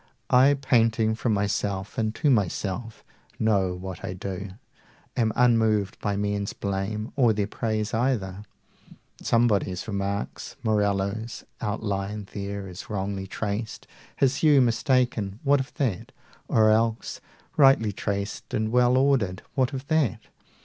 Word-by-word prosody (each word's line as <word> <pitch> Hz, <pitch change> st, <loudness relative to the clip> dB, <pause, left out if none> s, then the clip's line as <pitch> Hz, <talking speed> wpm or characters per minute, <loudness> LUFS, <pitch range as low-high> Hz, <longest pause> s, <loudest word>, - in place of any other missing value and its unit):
I, 135 Hz, +3 st, +6 dB
painting 115 Hz, -4 st, +2 dB
from 110 Hz, 0 st, 0 dB
myself 100 Hz, -1 st, -2 dB
and 110 Hz, -1 st, -1 dB
to 150 Hz, -3 st, +2 dB
myself, 105 Hz, +1 st, -1 dB, 0.3 s
90 -, -, -3 dB
Know 95 Hz, -4 st, +2 dB
what 90 Hz, -1 st, -7 dB
I 90 Hz, -, -3 dB
do, 95 Hz, +1 st, -5 dB, 0.7 s
am 115 Hz, -3 st, +2 dB
unmoved 110 Hz, -5 st, +2 dB
by 105 Hz, -1 st, -1 dB
men's 100 Hz, 0 st, -1 dB
blame 100 Hz, +2 st, -3 dB
Or 120 Hz, -5 st, +4 dB
their 105 Hz, -1 st, 0 dB
praise 110 Hz, 0 st, -2 dB
either. 110 Hz, -6 st, 0 dB, 0.8 s
Somebody 110 Hz, -5 st, +2 dB
remarks 100 Hz, -1 st, -3 dB
Morello's 105 Hz, +1 st, 0 dB, 0.2 s
outline 105 Hz, -1 st, -3 dB
there 100 Hz, -1 st, -4 dB
is 90 Hz, -1 st, -9 dB
wrongly 100 Hz, -2 st, -3 dB
traced, 105 Hz, +3 st, -4 dB, 0.3 s
His 135 Hz, -1 st, +2 dB
hue 150 Hz, -3 st, +5 dB
mistaken; 120 Hz, -4 st, +1 dB
what 140 Hz, 0 st, +4 dB
of 135 Hz, -, -4 dB
that? 115 Hz, -11 st, -2 dB, 0.4 s
or 110 Hz, -1 st, +4 dB
else, 115 Hz, +1 st, 0 dB, 0.3 s
Rightly 135 Hz, -7 st, +5 dB
traced 100 Hz, +1 st, -4 dB
and 110 Hz, 0 st, 0 dB
well 125 Hz, +1 st, +4 dB
ordered; 130 Hz, -9 st, +2 dB
what 130 Hz, -1 st, +1 dB
of 135 Hz, -1 st, -5 dB
that? 155 Hz, -, +1 dB
110 Hz, 130 wpm, -26 LUFS, 100-120 Hz, 0.8 s, I